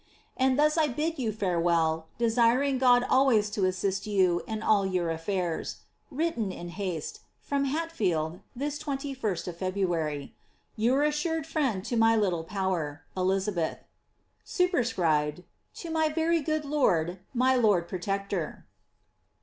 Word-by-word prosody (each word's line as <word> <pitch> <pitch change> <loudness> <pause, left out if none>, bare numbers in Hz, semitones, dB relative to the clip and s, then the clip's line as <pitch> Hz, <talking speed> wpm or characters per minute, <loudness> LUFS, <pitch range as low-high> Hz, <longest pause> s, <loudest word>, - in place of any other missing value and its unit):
And 260 0 +2
thus 305 +2 +3
I 310 - +4
bid 305 +4 -2
you 230 -4 0
farewell, 170 -5 +1
desiring 240 +4 +2
God 245 -1 +5
always 245 -6 +3
to 205 -3 0
assist 190 +2 -1
you 185 -4 +2
in 220 -1 -4
all 210 -3 +4
your 180 -3 0
affairs. 170 +1 -3 0.3
Written 275 - -1
in 175 -1 -8
baste. 180 -6 -4 0.2
From 280 -1 -1
Hatfelde, 195 - -1 0.2
this 285 +3 -3
2Ut 270 - -3
of 175 -2 -5
February. 170 -6 -2 0.4
Your 245 +6 +2
assured 300 +1 0
friend, 265 - -1
to 240 - -2
my 225 0 +4
little 185 -6 +1
power, 165 -6 -2 1.4
Superscribed. 180 - +1 0.2
— - - -47
To 335 - -5
my 315 -1 +2
very 325 +2 +1
good 310 0 -1
lord, 180 - +1 0.2
my 255 +2 +4
lord 205 -8 +3
protector.'' 195 -2 -3
215 Hz, 130 wpm, -28 LUFS, 180-275 Hz, 1.4 s, God